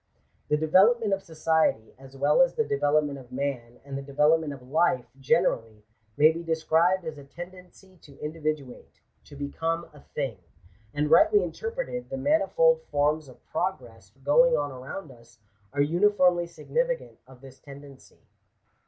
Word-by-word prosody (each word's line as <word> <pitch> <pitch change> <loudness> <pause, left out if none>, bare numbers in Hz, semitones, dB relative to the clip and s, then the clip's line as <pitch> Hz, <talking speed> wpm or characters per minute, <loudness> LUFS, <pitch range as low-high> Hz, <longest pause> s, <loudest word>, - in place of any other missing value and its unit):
The 150 - +2
development 195 +8 +4
of 195 - -1
society, 160 - 0
as 135 0 -14
well 145 - +3
as 265 - +3
the 230 - +2
development 145 -2 0
of 125 -2 -15
man 125 -3 -4
and 140 -1 -7
the 135 - -4
develop 150 +4 +2
ment 155 -2 -5
of 135 -3 -10
life 150 -3 +1
generally, 115 - 0 0.3
may 155 +2 +6
be 165 +1 -6
described 165 +2 +1
as 155 -2 -6
a - - -11
tendency 180 +4 -12
to 140 -4 -18
in 150 +1 -5
dividuate 155 -5 -5
— - - -42
to - - -14
become 165 +4 -3
a 150 - -15
thing. 135 -8 -5 0.5
And 150 +3 -1
rightly 415 +6 +6
interpreted, 455 - -5
the 270 - -4
manifold 485 - +3
forms 150 +1 +1
of 130 - -17
progress 120 - -4
going 245 - +5
on 145 -1 -2
around 135 +5 -8
us, 115 -1 -19 0.3
are 140 +1 0
uniformly 175 +2 +3
significant - - -3
of 130 -1 -17
this 135 -1 -14
tendency. 140 -1 -14
150 Hz, 160 wpm, -26 LUFS, 140-185 Hz, 0.5 s, may